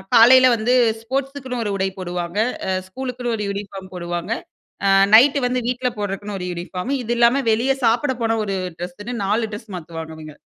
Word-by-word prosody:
காலையில 255 +3 +8
வந்து 230 +3 +1 0.3
ஸ்போர்ட்ஸுக்குன்னு 260 0 -3
ஒரு 205 - -1
உடை 190 0 0
போடுவாங்க, 175 +1 -3 0.3
அ - - 0 0.2
ஸ்கூலுக்குன்னு 250 +2 -4
ஒரு 210 - -3
யூனிஃபார்ம் 195 -2 -6
போடுவாங்க, 175 +2 -4 0.5
அ - - +4 0.3
நைட்‌டு 275 +5 +6
வந்து 250 0 0
வீட்ல 250 0 0
போடுறதுக்குன்னு 205 0 -4
ஒரு 180 - -4
யூனிஃபார்ம் 180 +6 -5
இது 235 - -4
இல்லாம 240 +3 +4
வெளியே 245 +5 +2
சாப்புட 250 +5 +2
போன 225 0 +2
ஒரு 195 -1 -2 0.2
ட்ரெஸ்ஸுன்னு 185 +7 -6
4 215 +2 0
ட்ரெஸ் 210 0 -8
மாத்துவாங்க 160 -1 -8
இவங்க. 155 -1 -10
215 Hz, 165 wpm, -21 LUFS, 185-250 Hz, 0.5 s, காலையில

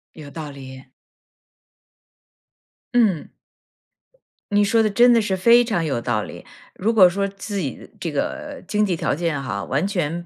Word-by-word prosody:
有 150 -3 -10
道 155 0 -7
理。 130 -1 -11 2.0
嗯。 215 -10 +2 1.2
你 205 0 +4
说 225 +2 +3
的 215 - +2
真 240 +4 +5
的 230 - +4
是 195 -3 -1
非 235 +5 +6
常 210 -8 -1
有 135 -6 -2
道 115 -3 -1
理。 - - -10 0.3
如 215 +5 0
果 195 -5 +7
说 200 +3 -1
自 200 +1 -6
己 140 -9 -5
这 - - -3
个 - - -4
经 210 +2 +1
济 185 -3 0
条 - - -1
件 160 -2 -2
哈， 110 -7 -4
完 145 +8 -1
全 175 -3 -2
180 Hz, 170 characters per minute, -22 LUFS, 145-210 Hz, 2.0 s, 果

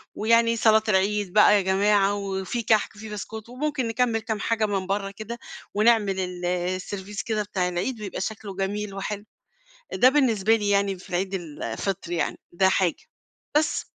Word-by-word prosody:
ويعني 230 +1 +3
صلاة 220 -1 +4
العيد 200 0 +1
بقى 210 0 +7
يا 205 - +4
جماعة 195 +1 +3
وفي 195 +3 -3
كَحك 220 -1 +2
وفي 220 +1 -9
بسكوت 215 +2 -7
وممكن 265 0 -2
نكمّل 225 0 +1
كام 220 -1 -3
حاجة 225 0 +1
من 195 -2 -2
برّه 195 0 -1
كده 220 +4 -7 0.3
ونعمل 210 -3 +3 0.3
السيرفيس 185 +3 -3
كده 215 -2 -1
بتاع 190 -3 -1
العيد 205 +7 -3
ويبقى 195 -2 -5
شكله 205 -1 -5
جميل 200 +1 -3
وحلو، 200 +1 -4 0.7
ده 255 - +6
بالنسبة 225 -7 +3
لي 205 -2 -1
يعني 200 -2 +1
في 180 - -6
عيد 190 +2 -1
الفطر 170 - -4
يعني 175 - -1
ده 190 +2 +3
حاجة. 185 -3 +1 0.5
بس 300 -1 0
205 Hz, 160 wpm, -25 LUFS, 190-220 Hz, 0.7 s, بقى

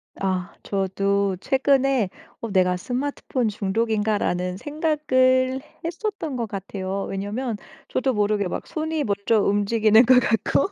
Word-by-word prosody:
아. 185 -1 -2
저도 195 0 0
최근에 270 -5 +2 0.3
어 230 -3 -4
'내가 180 -1 +3
스마트폰 255 +2 -2
중독인가?'라는 205 -3 0
생각을 260 - +1 0.2
했었던 345 - -3
것 235 -2 -2
같아요. 195 0 -4
왜냐하면 210 +4 -3 0.3
저도 260 -1 0
모르게 205 -2 +1
막 - - -5
손이 315 -1 -2
먼저 205 +2 +1
움직이는 215 +3 +4
것 250 +1 +7
같고 235 - +1
220 Hz, 280 characters per minute, -23 LUFS, 200-260 Hz, 0.3 s, 것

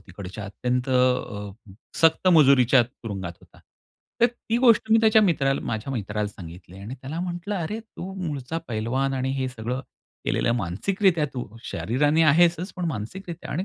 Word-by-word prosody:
तिकडच्या 95 +2 -9
अत्यंत 125 +5 -2
अ, 125 -6 +1 0.5
सक्त 165 +3 +4
मजुरीच्या 135 -5 +6
तुरुंगात 100 -7 -7
होता. - - -20 0.6
तर, 240 - +7
ती 235 -1 -3
गोष्ट 230 -3 +4
मी 225 - +7
त्याच्या 220 -1 +5
मित्राला 140 -7 +2
माझ्या 110 +5 -3
मित्राला 105 -2 -2
सांगितली 90 0 -12
आणि 105 +6 -7
त्याला 135 +6 -6
म्हटलं, 180 +3 -4
"अरे, 190 +5 -3
तू 195 -4 -9
मूळचा 145 +1 -4
पैलवान 120 +5 -1
आणि 130 0 -1
हे 130 -1 -1
सगळं 125 +2 -4 0.4
केलेलं 120 - +1
मानसिकरित्या 165 - +1
तू 125 - -4 0.2
शरीराने 145 +7 +1
आहेसच, 170 +4 +3
पण 180 - -3
मानसिकरित्या 165 - -5
आणि 175 +6 -2
135 Hz, 150 wpm, -24 LUFS, 110-175 Hz, 0.6 s, तर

